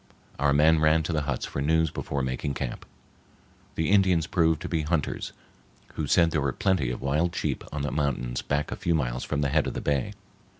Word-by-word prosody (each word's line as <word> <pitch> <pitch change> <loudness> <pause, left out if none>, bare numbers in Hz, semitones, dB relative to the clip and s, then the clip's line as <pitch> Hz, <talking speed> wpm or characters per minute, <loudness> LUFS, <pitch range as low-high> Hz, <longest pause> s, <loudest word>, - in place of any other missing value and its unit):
Our 70 +1 +3
men 75 +3 +5
ran 80 +1 +3
to 85 - -2
the 75 - +1
huts 65 - -1
for 70 - -4
news 80 +1 +2
before 70 -1 -3
making 65 +2 -2
camp. - - -5 0.9
The 80 +3 0
Indians 95 -5 +4
proved 80 -3 +2
to - - -3
be 80 -2 0
hunters, 75 -1 -2 0.6
who 75 - -3
said 85 +3 +4
there 80 - 0
were 70 -1 0
plenty 95 -10 +1
of 60 - -4
wild 75 +5 0
sheep - - -2
on 70 -1 -3
the 70 - -2
mountains 65 -4 -1
back 70 +1 -1
a - - -2
few 85 - 0
miles 65 -4 -1
from 75 -1 -2
the 70 - +1
head 75 +1 +2
of - - -4
the - - -2
bay. 70 -3 -1
75 Hz, 215 wpm, -27 LUFS, 70-80 Hz, 0.9 s, men